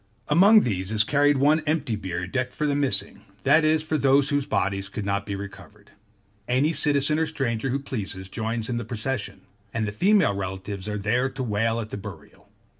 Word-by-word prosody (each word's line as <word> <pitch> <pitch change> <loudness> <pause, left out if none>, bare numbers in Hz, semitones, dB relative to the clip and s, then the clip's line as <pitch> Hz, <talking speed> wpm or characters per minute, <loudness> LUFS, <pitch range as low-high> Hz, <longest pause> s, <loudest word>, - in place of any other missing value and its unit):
Among 200 +8 +7
these 95 -4 -2
is 110 -1 +3
carried 145 +4 +3
one 150 +4 +4
empty 150 -7 0
bier 90 -3 -4
decked 130 +7 -3
for 150 - -2
the 145 - +1
missing, 130 -9 -1 0.2
that 160 - +5
is, 155 0 +2
for 155 -1 -1
those 135 +1 +4
whose 145 -1 0
bodies 100 0 -1
could 100 0 -5
not 100 0 -1
be 100 - -3
recovered. 100 +1 -11 0.6
Any 135 +6 +2
citizen 150 0 +1
or 160 - +1
stranger 135 -5 -2
who 130 - 0
pleases, 105 -8 -5
joins 110 +2 -3
in 120 - -2
the 120 - -3
procession: 110 -2 -3 0.3
and 110 -2 -2
the - - -3
female 190 - +3
relatives 95 0 -5
are 105 0 -2
there 120 +6 0
to 130 0 -5
wail 115 0 0
at 110 -2 -6
the - - -4
burial. 100 - -11
115 Hz, 195 wpm, -25 LUFS, 100-145 Hz, 0.6 s, Among